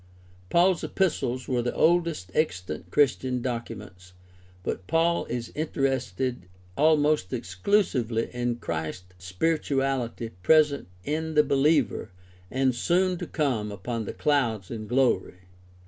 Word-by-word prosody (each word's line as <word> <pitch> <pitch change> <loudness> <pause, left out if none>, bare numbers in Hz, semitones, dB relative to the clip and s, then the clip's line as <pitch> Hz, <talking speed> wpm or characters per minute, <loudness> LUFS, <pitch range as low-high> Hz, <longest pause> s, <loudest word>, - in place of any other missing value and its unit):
Paul's 180 +1 +3
epistles 130 -9 -1
are 125 -2 +1
the 120 - -2
oldest 165 - +2
extant 90 - -2
Christian 130 -3 +2
documents, 105 -7 -6 0.5
but 90 - -4
Paul 170 +1 +2
is 120 -1 -4
interested 130 - -2 0.3
almost 150 -7 +3
exclusively 115 - 0
in 120 -1 -1
Christ 85 -2 -5
spiritually 130 - -1
present 150 - +4 0.2
in 160 +1 -2
the 150 - +6
behever 140 -4 +2 0.4
and 130 0 +1
soon 180 +7 +1
to - - -5
come 125 -9 -1
upon 110 +3 -4
the - - -5
clouds 120 -10 0
in 110 -2 -5
glory. 125 -7 +1
130 Hz, 115 wpm, -26 LUFS, 110-155 Hz, 0.5 s, the